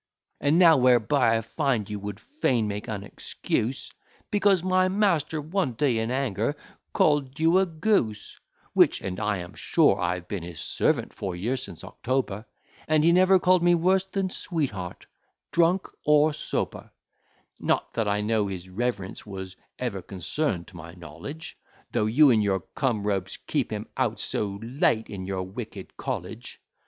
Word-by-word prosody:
And 145 Hz, +3 st, +3 dB
now, 170 Hz, -4 st, +7 dB
whereby 125 Hz, -1 st, +4 dB
I -, -, -1 dB
find 120 Hz, -3 st, -1 dB
you 105 Hz, -1 st, -5 dB
would 100 Hz, 0 st, -6 dB
fain 130 Hz, -, 0 dB
make 105 Hz, +1 st, -4 dB
an 105 Hz, -3 st, -4 dB
excuse, 115 Hz, +4 st, -3 dB, 0.4 s
Because 200 Hz, -3 st, +3 dB
my 185 Hz, 0 st, +3 dB
master, 185 Hz, -6 st, +1 dB
one 155 Hz, -2 st, -1 dB
day, 120 Hz, -1 st, +1 dB
in 110 Hz, +1 st, -1 dB
anger, 125 Hz, -1 st, -1 dB, 0.4 s
call'd 145 Hz, -2 st, +2 dB
you 165 Hz, +3 st, +5 dB
a 190 Hz, -, +2 dB
goose: 155 Hz, -, 0 dB, 0.3 s
Which, -, -, +4 dB
and 90 Hz, -1 st, -4 dB
I 105 Hz, -1 st, 0 dB
am 85 Hz, -1 st, -8 dB
sure -, -, +3 dB
I 90 Hz, 0 st, +1 dB
have 90 Hz, -1 st, -9 dB
been 100 Hz, -4 st, -4 dB
his 85 Hz, -1 st, -8 dB
servant -, -, 0 dB
four 95 Hz, -3 st, -4 dB
years 115 Hz, +8 st, -2 dB
since -, -, -9 dB
October, 120 Hz, -4 st, -2 dB, 0.4 s
And 155 Hz, -1 st, +3 dB
he 170 Hz, -, +5 dB
never 185 Hz, +2 st, +6 dB
call'd 185 Hz, 0 st, +4 dB
me 175 Hz, 0 st, +5 dB
worse 185 Hz, +3 st, +2 dB
than 190 Hz, -1 st, -2 dB
sweet 160 Hz, -9 st, -1 dB
heart, 90 Hz, -4 st, -7 dB, 0.5 s
drunk 170 Hz, +4 st, +3 dB, 0.2 s
or 150 Hz, +1 st, +4 dB
sober: 150 Hz, -, -3 dB, 0.7 s
Not -, -, 0 dB
that 115 Hz, -2 st, 0 dB
I 105 Hz, 0 st, +1 dB
know 105 Hz, -1 st, +1 dB
his 95 Hz, -1 st, -6 dB
reverence 100 Hz, -1 st, -3 dB
was 95 Hz, -2 st, -7 dB, 0.2 s
ever 115 Hz, -7 st, -3 dB
concern'd 95 Hz, -, -2 dB
to 95 Hz, -, -17 dB
my 85 Hz, +1 st, -10 dB
knowledge, 90 Hz, -, -9 dB, 0.3 s
Though 105 Hz, -, +1 dB
you 140 Hz, +5 st, +6 dB
and 110 Hz, -3 st, +4 dB
your 95 Hz, -2 st, +1 dB
come 120 Hz, -7 st, 0 dB
rogues 95 Hz, -3 st, -1 dB
keep -, -, 0 dB
him -, -, -3 dB
out -, -, 0 dB
so 100 Hz, -1 st, -2 dB
late 115 Hz, -2 st, +1 dB
in 95 Hz, -2 st, -6 dB
your 95 Hz, -1 st, -2 dB
wicked 95 Hz, +1 st, -8 dB
college. -, -, -5 dB
120 Hz, 165 wpm, -26 LUFS, 100-160 Hz, 0.7 s, now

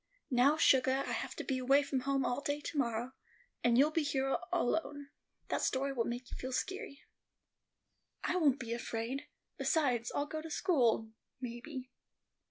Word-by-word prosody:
"Now, 265 Hz, +5 st, +5 dB
sugah, 265 Hz, -3 st, +4 dB
I -, -, -3 dB
have -, -, -3 dB
to -, -, -4 dB
be 265 Hz, -2 st, -1 dB
away 270 Hz, +3 st, +4 dB
from 280 Hz, -1 st, -1 dB
home 270 Hz, 0 st, 0 dB
all 245 Hz, +3 st, 0 dB
day 290 Hz, 0 st, -1 dB
to 295 Hz, -, -6 dB
morrow, 240 Hz, 0 st, -1 dB, 0.5 s
and 240 Hz, -1 st, +4 dB
you'll 290 Hz, +4 st, +5 dB
be 325 Hz, -, +1 dB
here 270 Hz, -2 st, 0 dB, 0.2 s
alone; 285 Hz, +1 st, -1 dB, 0.4 s
that -, -, 0 dB
story 275 Hz, +1 st, 0 dB
will 235 Hz, -3 st, 0 dB
make 245 Hz, +1 st, -5 dB
you -, -, -6 dB
feel 260 Hz, -, -5 dB
skeery." 300 Hz, 0 st, -3 dB, 1.2 s
"I -, -, 0 dB
won't 290 Hz, -6 st, +4 dB
be 235 Hz, -2 st, -3 dB
afraid. 235 Hz, +4 st, -3 dB, 0.3 s
Besides, 255 Hz, -8 st, +1 dB
I'll 285 Hz, -, +1 dB
go 310 Hz, +1 st, -5 dB
to 325 Hz, -, -8 dB
school, 245 Hz, -, +2 dB, 0.3 s
maybe." 255 Hz, +2 st, -6 dB
270 Hz, 170 wpm, -34 LUFS, 245-290 Hz, 1.2 s, Now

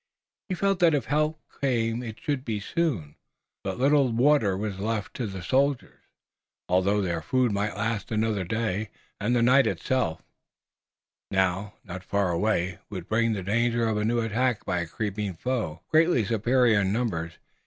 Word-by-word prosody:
He 185 Hz, -, -1 dB
felt 195 Hz, 0 st, +1 dB
that 170 Hz, -3 st, +5 dB
if 135 Hz, -6 st, -1 dB
help 155 Hz, +2 st, 0 dB, 0.2 s
came 115 Hz, -3 st, +1 dB
it 115 Hz, -3 st, -7 dB
should 140 Hz, -3 st, -2 dB
come 110 Hz, -5 st, -2 dB
soon. 100 Hz, -, -2 dB, 0.5 s
But 95 Hz, -1 st, -3 dB
little 140 Hz, 0 st, +3 dB
water 115 Hz, -5 st, +3 dB
was 100 Hz, -2 st, -4 dB
left 105 Hz, -1 st, -2 dB
to 120 Hz, -, -2 dB
the 95 Hz, -2 st, -7 dB
soldiers, 135 Hz, +6 st, 0 dB, 0.7 s
although 100 Hz, +3 st, +2 dB
their 85 Hz, -3 st, -1 dB
food 125 Hz, +7 st, +1 dB
might 100 Hz, 0 st, -1 dB
last 110 Hz, 0 st, -2 dB
another 110 Hz, -3 st, 0 dB
day, 110 Hz, +1 st, -2 dB, 0.3 s
and 120 Hz, +4 st, +1 dB
the 120 Hz, -, +3 dB
night 135 Hz, +3 st, +5 dB
itself, 125 Hz, -12 st, -1 dB, 1.1 s
now 95 Hz, +2 st, 0 dB
not 90 Hz, -1 st, -8 dB
far 100 Hz, -1 st, 0 dB
away, 90 Hz, -1 st, 0 dB
would 95 Hz, -4 st, -6 dB
bring 115 Hz, +1 st, +2 dB
the 100 Hz, -3 st, -4 dB
danger 115 Hz, +3 st, +1 dB
of 110 Hz, -1 st, 0 dB
a 105 Hz, -, 0 dB
new 120 Hz, +2 st, +1 dB
attack 115 Hz, +1 st, 0 dB
by 90 Hz, -, 0 dB
a 85 Hz, -, -3 dB
creeping 105 Hz, +1 st, -3 dB
foe, 110 Hz, -8 st, -3 dB
greatly 160 Hz, -, +4 dB
superior 115 Hz, 0 st, +3 dB
in 95 Hz, -1 st, 0 dB
numbers. 95 Hz, -8 st, -2 dB
110 Hz, 165 wpm, -26 LUFS, 95-125 Hz, 1.1 s, that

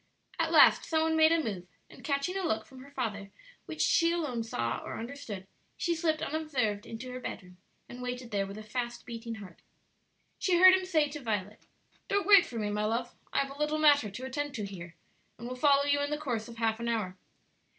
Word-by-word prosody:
At -, -, +1 dB
last -, -, +7 dB
some 320 Hz, -1 st, +1 dB
one 320 Hz, 0 st, +1 dB
made 315 Hz, 0 st, +6 dB
a 330 Hz, -1 st, +3 dB
move, 185 Hz, -6 st, -4 dB, 0.2 s
and -, -, -15 dB
catching 280 Hz, +6 st, -1 dB
a 390 Hz, -, -1 dB
look 220 Hz, -10 st, -1 dB
from 260 Hz, -1 st, -13 dB
her 275 Hz, -, -13 dB
father 215 Hz, -8 st, -4 dB, 0.4 s
which -, -, -4 dB
she 335 Hz, -1 st, +4 dB
alone 300 Hz, -9 st, -1 dB
saw 120 Hz, -, -2 dB
or -, -, -6 dB
understood, 230 Hz, -5 st, -7 dB, 0.3 s
she 345 Hz, -, 0 dB
slipped 320 Hz, -2 st, 0 dB
unobserved 265 Hz, -10 st, -1 dB
into 245 Hz, +3 st, -7 dB
her 255 Hz, -, -5 dB
bedroom 180 Hz, -6 st, -8 dB, 0.3 s
and 245 Hz, -, -9 dB
waited 250 Hz, -1 st, -5 dB
there 200 Hz, -1 st, 0 dB
with 200 Hz, +1 st, -8 dB
a 215 Hz, -, -8 dB
fast 240 Hz, +2 st, -4 dB
beating 230 Hz, -1 st, -6 dB
heart. 195 Hz, -6 st, -12 dB, 0.8 s
She 360 Hz, -2 st, +2 dB
heard 370 Hz, +1 st, +9 dB
him 375 Hz, 0 st, +2 dB
say 315 Hz, -5 st, +2 dB
to 295 Hz, +1 st, -6 dB
Violet, 210 Hz, -3 st, -4 dB, 0.4 s
"Don't 400 Hz, 0 st, +1 dB
wait 400 Hz, -3 st, +7 dB
for 235 Hz, -, -7 dB
me, 210 Hz, -2 st, -1 dB
my 210 Hz, 0 st, -1 dB
love; 235 Hz, +3 st, -1 dB, 0.2 s
I -, -, +2 dB
have 275 Hz, -, -10 dB
a -, -, -15 dB
little 300 Hz, +1 st, 0 dB
matter 290 Hz, -7 st, +5 dB
to 230 Hz, +7 st, -7 dB
attend 290 Hz, +2 st, -3 dB
to 210 Hz, -4 st, -3 dB
here, 175 Hz, -4 st, -9 dB, 0.4 s
and 235 Hz, -, -7 dB
will 250 Hz, -, -5 dB
follow 280 Hz, +1 st, +4 dB
you 285 Hz, 0 st, +2 dB
in 285 Hz, -, -1 dB
the 300 Hz, -, -1 dB
course 245 Hz, -8 st, -3 dB
of 235 Hz, -1 st, -11 dB
half 225 Hz, -1 st, 0 dB
an 235 Hz, -, -3 dB
hour." 215 Hz, -6 st, -1 dB
250 Hz, 225 wpm, -30 LUFS, 215-300 Hz, 0.8 s, heard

